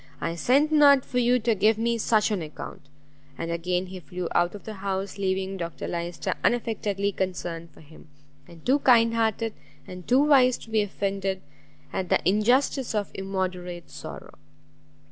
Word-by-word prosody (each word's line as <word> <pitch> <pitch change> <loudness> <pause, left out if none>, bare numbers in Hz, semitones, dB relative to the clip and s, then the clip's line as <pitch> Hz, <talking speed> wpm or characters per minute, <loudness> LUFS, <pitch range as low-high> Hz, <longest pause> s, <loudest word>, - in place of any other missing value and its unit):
I 165 - -2
sent 275 - +2
not 285 -3 +6
for 250 - -1
you 245 +1 +4
to 230 -1 +1
give 215 +2 +3
me 230 +1 0
such 215 -1 +2
an 200 -4 -1
account!" 155 -2 -8 0.6
And 165 0 -3
again 180 +2 -1
he 185 0 -8
flew 180 0 -5
out 175 +3 +2
of 205 - -10
the 220 - -7
house, 195 0 -3
leaving 190 0 -1
Dr 170 -2 -5
Lyster 170 0 -3
unaffectedly 205 -4 0
concerned 175 -3 -4
for - - -18
him, 155 +1 -16 0.4
and 170 -2 -15
too 270 +3 +3
kind 230 -4 +5
hearted 225 -1 0 0.3
and 180 -1 -10
too 260 +3 +5
wise 260 -4 +5
to 225 - -14
be 220 -1 +3
offended 195 -1 -2 0.5
at 185 -2 -2
the - - +4
injustice 245 +5 +2
of 205 -2 -1
immoderate 185 -3 -4
sorrow. - - -9
200 Hz, 165 wpm, -26 LUFS, 180-230 Hz, 0.6 s, not